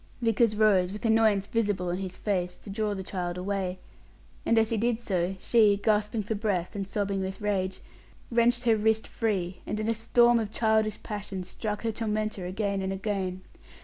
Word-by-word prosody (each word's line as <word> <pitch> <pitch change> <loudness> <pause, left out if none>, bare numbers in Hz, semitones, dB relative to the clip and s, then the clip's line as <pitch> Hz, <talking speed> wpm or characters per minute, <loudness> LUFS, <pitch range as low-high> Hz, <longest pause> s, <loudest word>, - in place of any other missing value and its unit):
Vickers 230 -2 +2
rose, 200 -4 +4
with 210 +3 -6
annoyance 220 -3 +4
visible 205 -5 0
on 175 - -1
his 185 -1 -5
face, 180 -4 -1
to 200 - -10
draw 210 0 -1
the 190 - -5
child 180 -2 -4
away; 185 -1 -2 0.7
and 230 - +4
as 225 0 +3
he 225 - +1
did 230 +1 +1
so, 190 -4 -1
she, 210 0 +4
gasping 210 +1 +1
for 210 - -2
breath, 200 -3 -1
and 195 -1 -3
sobbing 200 -1 -1
with 190 +2 -4
rage, 190 -3 -1 0.5
wrenched 240 +1 +3
her 230 -2 +4
wrist 220 +1 +1
free, 190 -5 -2
and 210 - -2
in 215 - -2
a 230 - +2
storm 235 +1 +4
of 220 -2 -2
childish 220 -1 +1
passion 205 -3 -5
struck 210 +4 -4
her 225 - 0
tormentor 215 -3 -2
again 200 +1 -1
and 190 0 -2
again. 190 -2 -2
210 Hz, 185 wpm, -28 LUFS, 190-220 Hz, 0.7 s, rose